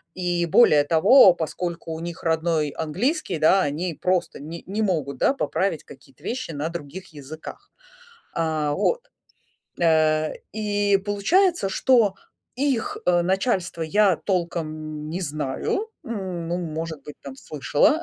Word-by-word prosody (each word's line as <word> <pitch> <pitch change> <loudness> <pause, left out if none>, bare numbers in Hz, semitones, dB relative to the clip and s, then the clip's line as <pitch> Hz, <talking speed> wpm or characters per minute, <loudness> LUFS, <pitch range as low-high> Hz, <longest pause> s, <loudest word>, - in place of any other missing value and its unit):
И 175 -1 0
более 155 -6 +6
того, 170 - +6
поскольку 170 0 -4
у 160 - -5
них 170 0 -7
родной 160 -2 +1
английский, 190 - -2
да, 185 +5 +4
они 165 +3 -2
просто 180 +3 -1
не 165 +3 -8
не 205 +3 -3
могут, 150 -9 -1
да, 275 - +3
поправить 190 - -1
какие-то 135 -2 -17
вещи 255 -5 -4
на 150 +1 -3
других 170 +2 -8
языках. 155 - -10 0.7
А, 155 -2 0
вот. 480 - +1 0.8
А, 155 -1 +3 0.2
и 205 -1 +1
получается, 205 - +1
что 230 -4 +3 0.4
их, 265 -3 -1
э, 175 -1 +4
начальство 185 -2 0
я 190 +3 +3
толком 155 -4 -3
не 175 +4 -4
знаю, 150 - -2 0.2
н 185 -7 -4
ну, 175 - -1
может 160 -3 -5
быть, 150 +1 -9
там, 135 -1 -8
слышала. 150 - +1
170 Hz, 135 wpm, -24 LUFS, 155-200 Hz, 0.8 s, более